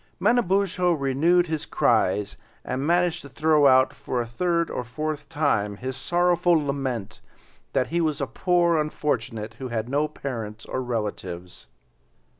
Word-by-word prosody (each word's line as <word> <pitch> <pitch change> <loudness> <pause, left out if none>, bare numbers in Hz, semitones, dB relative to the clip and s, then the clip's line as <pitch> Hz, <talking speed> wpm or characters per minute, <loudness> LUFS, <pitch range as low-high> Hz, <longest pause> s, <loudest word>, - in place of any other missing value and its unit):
Manabozho 190 -6 +2
renewed 160 +5 +2
his 160 -3 -4
cries 100 -1 +1 0.3
and 135 +3 -2
managed 175 0 +2
to 140 - -11
throw 150 +2 +3
out 130 0 +5
for 125 - -3
a 120 - -1
third 170 +8 0
or 125 - -3
fourth 150 +4 -4
time, 125 -10 0
his 130 +3 -5
sorrowful 175 +5 +2
lament 135 -8 -2 0.5
that 125 - +1
he 170 +1 0
was 155 -2 0
a 140 - 0
poor 170 +5 +2
unfortunate 115 -7 -2
who 130 - -4
had 115 -2 -3
no 145 +4 +1
parents 110 -7 -6
or 130 - -3
relatives. 95 - -5
140 Hz, 145 wpm, -25 LUFS, 120-170 Hz, 0.5 s, out